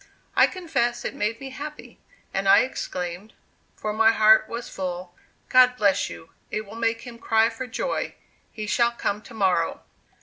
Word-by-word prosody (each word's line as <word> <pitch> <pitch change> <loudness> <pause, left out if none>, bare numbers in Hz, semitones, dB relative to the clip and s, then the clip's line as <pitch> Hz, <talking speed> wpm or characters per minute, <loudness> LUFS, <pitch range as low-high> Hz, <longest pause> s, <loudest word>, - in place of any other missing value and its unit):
I - - +6
confess 320 -10 -2
it - - -2
made 220 +2 -2
me 270 -1 -7
happy, 300 +3 -9 0.3
and 195 0 0
I - - +8
exclaimed, 180 -5 -4 0.4
for 215 -1 -3
my 220 +1 +5
heart 220 -1 +5
was 235 +1 -5
full, 180 -1 -5 0.3
"God 255 -1 +6
bless 200 -4 +2
you, 165 - -11 0.2
it 215 - -3
will 205 - -12
make 230 0 -1
him 235 -2 -10
cry 225 0 +3
for 250 +3 -6
joy; - - -3 0.4
he 215 - -6
shall 235 +2 +2
come 210 -3 -2
to 235 - -14
morrow." 185 -5 +1
225 Hz, 170 wpm, -25 LUFS, 200-240 Hz, 0.4 s, I